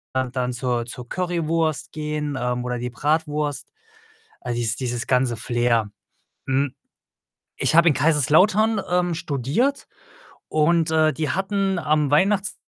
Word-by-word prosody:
und 130 -1 -1
dann 125 0 -1
zur 120 -1 -1
zur 120 0 -9
Currywurst 165 -4 -1
gehen, 150 -2 -3
ähm, 125 0 -2
oder 125 0 -2
die 125 +1 -3
Bratwurst. 150 +2 -1 0.7
All 120 - -3
dies 120 -1 -1
dieses 120 -2 -3
ganze 125 -2 +2
Flair. 120 -2 0 0.6
Hm, 135 0 0 0.8
ich 160 - +1
habe 170 - +6
in 150 - +3
Kaiserslautern, 180 - +3
ähm, 180 -1 +1
studiert 160 - -1 0.6
und, 160 +1 +2
äh, 155 -1 +3
die 155 -2 -2
hatten 195 0 -1
am 150 -2 +1
Weihnachts 195 +6 +2
150 Hz, 130 wpm, -23 LUFS, 125-170 Hz, 0.8 s, habe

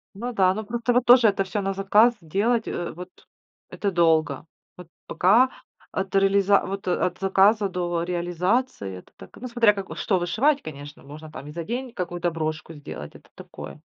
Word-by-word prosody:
Ну 240 +5 -5
да. 185 -4 +3
Ну 215 +2 -5
просто 235 +3 -1
вот 245 0 +2
тоже 240 -1 +7
это 195 -1 +1
всё 195 +2 -3
на 195 0 -2
заказ 210 +5 +4
делать, 215 +8 0
э, 175 - -4
вот 180 +2 -9 0.6
это 200 - -2
долго. 160 -5 +2 0.3
Вот 180 -2 -11 0.2
пока 225 +8 +4 0.4
от 190 0 -4
реализа 195 0 +4
вот 195 0 -6
от 180 -1 0
заказа 195 +2 +3
до 175 -2 -2
реализации, 175 - -1
это 90 - -15
так, 95 - -14
ну 255 - -7
смотря 235 -3 +3
как, 195 -2 -7
э, - - -7
что 190 -4 0
вышивать, 255 - +1
конечно. 145 -1 -10
Можно 150 +2 -11
там 145 -2 -9
и - - -8
за 170 +2 -5
день 245 +5 -5
какую-то 175 -3 -3
брошку 155 0 -4
сделать, 140 - -9
это - - -17
такое. 75 -1 -11
190 Hz, 185 wpm, -24 LUFS, 165-215 Hz, 0.6 s, тоже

